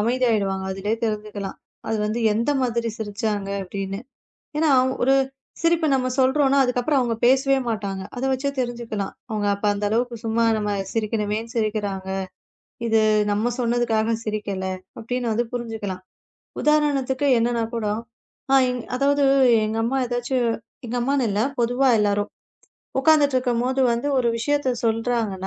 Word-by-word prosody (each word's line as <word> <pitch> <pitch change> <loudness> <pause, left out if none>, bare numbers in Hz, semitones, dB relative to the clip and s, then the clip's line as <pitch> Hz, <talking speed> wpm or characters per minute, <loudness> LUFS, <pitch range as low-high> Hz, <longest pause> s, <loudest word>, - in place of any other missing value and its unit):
அமைதியா 245 +3 +2
ஆயிடுவாங்க. 195 -3 0
அதுலயே 200 +3 -2
தெரிஞ்சுக்கலாம். 210 -2 -4 0.3
அது 225 - 0
வந்து 220 +3 -2
எந்த 230 +6 0
மாதிரிச் 235 -2 -1
சிரிச்சாங்க 205 -1 -2
அப்படின்னு. 195 +1 -4 0.6
ஏன்னா 315 0 +3 0.3
ஒரு 265 +2 +4 0.5
சிரிப்பை 335 -1 +2
நாம 255 -1 0
சொல்றோம்னா, 275 +1 +3
அதுக்கப்புறம் 250 +3 +1
அவங்க 240 -2 0
பேசவே 270 +2 +4
மாட்டாங்க. 195 -3 -3
அதை 260 - -1
வச்சே 265 +2 -1
தெரிஞ்சுக்கலாம். 235 -5 -3 0.2
அவங்க 210 -1 -1
அப்ப 200 - -9
அந்த 205 - -3
அளவுக்குச் 235 +1 -1
சும்மா 225 +1 +1
நம்ம 210 -1 -1 0.2
சிரிக்கனுமேன்னு 220 0 -2
சிரிக்கிறாங்க. 205 -3 -1 0.8
இது 225 -1 +3 0.3
நம்ம 215 +4 +1
சொன்னதுக்காகச் 230 -2 +1
சிரிக்கல 205 -3 -3 0.3
அப்படின்னு 245 +1 -2
வந்து 235 +2 +1
புரிஞ்சுக்கலாம். 220 -6 -4 0.6
உதாரணத்துக்கு 285 -3 +2
என்னன்னா 235 0 +1
கூட, 225 -2 -2 1.1
அதாவது 280 +2 +2 0.4
எங்க 215 +1 -2
அம்மா 265 +3 0
எதாச்சு 245 +2 -2 0.5
எங்க 240 - -3
அம்மான்னு 270 0 +1
இல்ல, 205 - 0 0.2
பொதுவா 245 +3 +2
எல்லாரும் 205 0 +1 0.7
உக்காந்துட்டு 285 -2 +4
இருக்கும்போது 250 +1 0
வந்து 235 +4 -1
ஒரு 245 - +2
விஷயத்தைச் 260 -1 0
சொல்றாங்க. 225 -1 0
230 Hz, 130 wpm, -23 LUFS, 210-255 Hz, 1.1 s, ஒரு